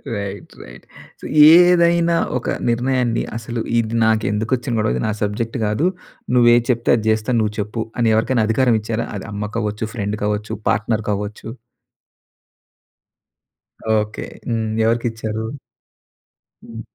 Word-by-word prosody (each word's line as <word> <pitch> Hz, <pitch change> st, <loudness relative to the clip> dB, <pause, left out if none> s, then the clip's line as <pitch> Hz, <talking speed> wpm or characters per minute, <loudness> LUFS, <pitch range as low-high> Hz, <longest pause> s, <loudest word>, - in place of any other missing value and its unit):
Right. 100 Hz, -1 st, -6 dB
Right. -, -, -14 dB, 0.3 s
So, -, -, -23 dB, 0.3 s
ఏదైనా 170 Hz, -1 st, +4 dB, 0.2 s
ఒక 125 Hz, -, -6 dB, 0.2 s
నిర్ణయాన్ని, 120 Hz, 0 st, 0 dB
అసలు 115 Hz, 0 st, -5 dB, 0.2 s
ఇది 115 Hz, 0 st, -2 dB
నాకెందుకొచ్చిన 110 Hz, +4 st, 0 dB
గొడవ! 110 Hz, -, +1 dB
ఇది -, -, -2 dB
నా -, -, 0 dB
సబ్జెక్ట్ 110 Hz, +4 st, -2 dB
కాదు. 105 Hz, +12 st, +1 dB, 0.5 s
నువ్వు 120 Hz, -1 st, +6 dB
ఏది 120 Hz, -, +2 dB
చెప్తే 120 Hz, 0 st, 0 dB
అది 110 Hz, -, -5 dB
చేస్తాను. 110 Hz, +2 st, 0 dB
నువ్వు 105 Hz, 0 st, -2 dB
చెప్పు, 105 Hz, +2 st, -3 dB, 0.2 s
అని 115 Hz, -1 st, +3 dB
ఎవరికైనా 110 Hz, 0 st, +1 dB
అధికారం 120 Hz, +1 st, +3 dB
ఇచ్చారా? 115 Hz, +2 st, -3 dB
అది -, -, -8 dB
అమ్మ 105 Hz, +1 st, -4 dB
కావచ్చు, 105 Hz, -1 st, -3 dB
ఫ్రెండ్ 105 Hz, -1 st, -3 dB
కావచ్చు, 105 Hz, 0 st, -2 dB, 0.2 s
పార్ట్నర్ 110 Hz, +1 st, 0 dB
కావచ్చు. 105 Hz, +2 st, -5 dB, 2.5 s
ఓకే. 105 Hz, 0 st, -4 dB, 0.2 s
హ్మ్. 115 Hz, -1 st, -1 dB, 0.2 s
ఎవరికిచ్చారు? 110 Hz, -1 st, -1 dB, 1.2 s
హ్మ్. 115 Hz, -1 st, -8 dB
110 Hz, 125 wpm, -19 LUFS, 105-120 Hz, 2.5 s, నువ్వు